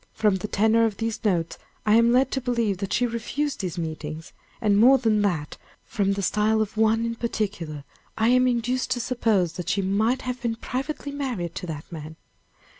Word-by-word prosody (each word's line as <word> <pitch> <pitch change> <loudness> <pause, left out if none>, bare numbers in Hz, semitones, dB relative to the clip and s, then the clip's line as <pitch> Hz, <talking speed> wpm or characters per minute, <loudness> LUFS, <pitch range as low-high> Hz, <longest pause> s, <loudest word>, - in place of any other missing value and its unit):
From 210 -3 +2
the 190 - -4
tenor 220 +3 +3
of 215 -3 -2
these 225 0 -3
notes, 175 -6 0 0.3
I 210 - +4
am 230 +1 +5
led 255 +2 +3
to 265 - -1
believe 235 -6 0
that 195 -1 -4
she 245 - +2
refused 245 +5 -2
these 180 -4 -4
meetings; 160 -1 -5 0.3
and, 205 -2 +3
more 260 +5 +7
than 220 -4 +2
that, 170 -8 -1 0.3
from 200 -2 0
the 200 0 -3
style 215 +3 +2
of 215 -1 -2
one 220 +1 +2
in 230 - -1
particular 200 -10 -3 0.3
I 220 +1 +3
am 255 +1 +4
induced 250 +1 0
to 245 - -4
suppose 225 -8 +1
that 180 - -5
she 200 - +1
might 220 +7 +1
have 250 -1 -4
been 235 -1 -1
privately 275 +5 -4
married 245 - -3
to 180 - -6
that 155 -2 -6
man. 160 -1 -8
220 Hz, 195 wpm, -25 LUFS, 190-240 Hz, 0.3 s, more